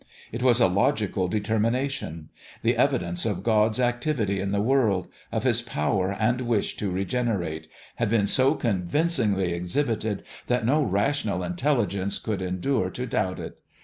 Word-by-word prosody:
It 115 - -5
was 125 -2 +4
a 120 - +6
logical 100 0 +1
determination. 110 - -1 0.3
The - - +3
evidence 85 0 +1
of 100 -4 -2
God's 110 +1 +2
activity 120 -5 0
in 100 +1 -2
the 100 - +1
world 110 -5 +2 0.2
of - - -1
His - - +2
power 95 +5 -1
and 120 +3 +1
wish 120 -4 0
to 105 - -2
regen 100 +7 -1
erate 80 -7 -2 0.3
had 115 -3 0
been 110 -2 +3
so 130 +8 +3
convincingly 105 - +1
exhibited 105 +4 -1 0.2
that 125 -2 +1
no 145 +6 +3
rational 100 -3 0
intelligence 100 0 0
could 105 -4 -3
endure 95 +3 0
to 125 +6 -5
doubt 95 -6 -1
it. - - -8
105 Hz, 150 wpm, -26 LUFS, 95-125 Hz, 0.3 s, a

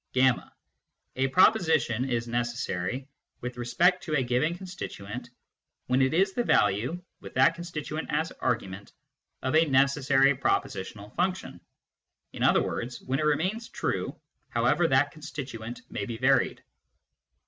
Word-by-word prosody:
(y) 130 0 +6 0.8
A 135 +1 +2
proposition 160 - +3
is 120 -1 -1
necessary 120 0 -2 0.3
with 125 0 -5
respect 170 +10 +2
to 155 - -2
a 135 - +2
given 125 +8 0
constituent 180 - -7 0.6
when 130 +1 +2
it 130 - +3
is 190 +4 +2
the 240 - 0
value, 125 - +2 0.2
with - - -11
that 165 - +5
constituent 160 -2 -5
as 160 +2 0
argument, 100 -4 -2 0.5
of 130 +4 0
a 160 +1 +6
necessary 135 0 +4
prepositional 105 -6 -2
function, 185 +1 -2 0.7
in - - -8
other - - +4
words, 120 +1 -4
when 135 +2 -1
it 155 - 0
remains 185 +10 0
true - - -3 0.3
however 175 - +2
that 135 0 +3
constituent 130 -6 -7
may - - -3
be 115 -2 -4
varied. 130 +2 +2
135 Hz, 135 wpm, -28 LUFS, 120-160 Hz, 0.8 s, y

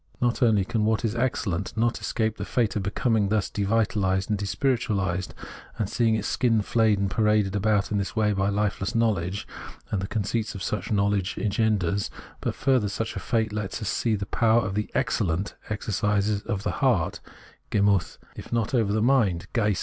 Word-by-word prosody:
Not 120 -1 0
only 110 -6 +4
can 115 0 -1
what 110 +2 +1
is 110 - 0
excellent 115 -6 -1
not 120 +1 +1
escape 110 -2 -1
the - - -4
fate 115 -4 0
of 105 - 0
becoming 105 +1 +1
thus 105 -1 0
devitalised 100 -2 +1
and 105 - 0
despirituahsed, 100 -5 0 0.5
and 110 - -1
seeing 115 +1 +2
its 110 -1 -2
skin 115 -4 +2
flayed 110 -1 +3
and 100 0 0
paraded 105 -3 +2
about 105 0 +1
in 105 - +1
this 100 - -4
way 105 -2 +2
by 95 0 +1
hfeless 100 -1 -1
knowledge, 100 -5 0 0.4
and 100 - 0
the 95 - -3
conceit 110 +1 -1
such 95 +1 -4
knowledge 100 -2 +1
engenders; 100 -3 0 0.3
but, - - -2
further, 130 -6 +2
such 110 +3 -3
a - - -3
fate 110 -3 0
lets 105 -1 -3
us 105 -4 -3
see 115 -2 +1
the 100 -1 -3
power 110 -1 +2
the 105 +2 -2
" - - -24
excellent 95 -1 0
" - - -19
exercises 105 0 0
over 105 -4 -2
the - - 0
heart 105 - +1 0.5
(GemutJi), 100 -2 +2 0.2
if - - -10
not 115 -1 0
over 115 -5 +2
the 110 +1 +1
mind 115 -10 +2
(Geist). 105 -5 +1
105 Hz, 185 wpm, -26 LUFS, 100-115 Hz, 0.5 s, only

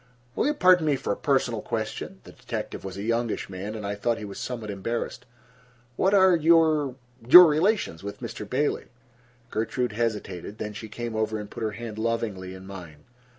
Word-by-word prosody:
"Will - - +1
you 300 - +1
pardon 180 - +5
me 145 - +3
for 130 -6 -2
a - - -4
personal 125 -5 0
question?" 110 - -4
The - - -13
detective - - -6
was 95 -1 -7
a 100 - -5
youngish 115 -2 -1
man, 100 +4 -5
and 105 -2 -6
I 100 - -2
thought 115 +3 -1
he 110 - -6
was 100 -1 -8
somewhat 115 -4 -5
embarrassed. 115 +6 -4 0.7
"What 195 +8 +3
are 190 -2 +6
your—your 150 -3 +5
relations 160 - +1
with 100 0 -6
Mr. 105 - -7
Bailey?" 145 +5 0 0.7
Gertrude 120 +2 -1
hesitated. 105 -3 -3
Then 105 -1 -5
she 110 +1 -8
came 120 +1 -5
over 110 0 -1
and 105 -1 -8
put - - -8
her 110 -1 -1
hand 110 0 -7
lovingly 110 -5 -2
in 95 0 -11
mine. 85 -6 -10
115 Hz, 185 wpm, -26 LUFS, 100-135 Hz, 0.7 s, are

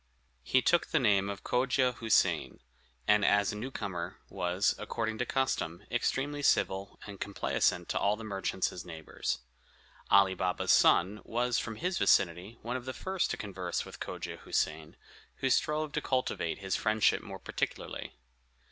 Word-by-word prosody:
He 130 - +2
took 175 - +3
the - - +1
name 100 -5 +3
of 100 -1 -6
Cogia 125 0 +2
Houssain, 110 -2 +2 0.5
and, 105 0 +5
as 100 0 +3
a - - -6
newcomer, 100 -7 -5
was, 90 +2 +1
according 110 0 -3
to 125 - -1
custom, 85 -11 -1
extremely 145 +2 0
civil 95 -7 +1
and 100 -2 -9
complaisant 100 -1 0
to - - 0
all 100 +1 +2
the 110 - -9
merchants 95 -3 -1
his 90 - -7
neighbors. 80 -6 -4 0.7
Ali 95 -1 +6
Baba's 90 -1 0
son 100 +5 +4
was, 120 +1 0
from 115 - -4
his 180 - -1
vicinity, 95 +5 +2
one 120 +3 -2
of 125 - -9
the 130 - -4
first 190 -1 -1
to - - -2
converse 95 -4 -3
with - - -11
Cogia - - -5
Houssain, 80 0 -2 0.4
who 135 - 0
strove 155 +3 +1
to 150 - -1
cultivate 130 - -1
his 95 -1 -2
friendship 110 -1 +2
more - - -8
particularly. - - -4
105 Hz, 155 wpm, -31 LUFS, 95-125 Hz, 0.7 s, Ali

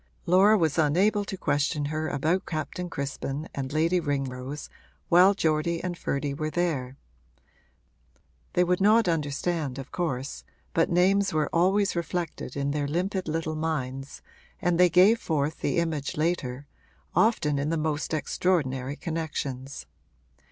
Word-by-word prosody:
Laura 195 +5 +5
was 160 -3 +1
unable 190 +8 +3
to 195 -1 -6
question 145 -2 0
her 155 +2 -2
about 160 +6 0
Captain 175 +3 -4
Crispin 140 +1 -4
and 135 -1 -4
Lady 165 +4 +2
Ringrose 135 -2 -3 0.4
while 185 +3 +6
Geordie 165 -1 0
and 180 -1 -2
Ferdy 140 -3 -2
were 155 +2 -3
there: 145 -7 -2 1.6
they 180 - +4
would 180 +1 +1
not 215 +1 +5
understand, 150 -2 -1
of 135 - -8
course, 140 -6 -3 0.3
but 165 - +2
names 190 +3 +3
were 155 -1 0
always 190 +4 +2
reflected 170 -5 -3
in 140 0 -1
their 145 -1 -1
limpid 185 +4 -2
little 160 0 -2
minds 140 -4 -4 0.4
and 175 -2 +1
they 180 0 +6
gave 190 +7 +5
forth 155 -3 -1
the - - -1
image 160 -5 -1
later 145 -5 -1 0.5
often 155 -11 +2
in 145 +2 -1
the 165 - 0
most 155 -1 -2
extraordinary 145 -4 0
connections. 145 -5 -4
160 Hz, 135 wpm, -27 LUFS, 145-180 Hz, 1.6 s, while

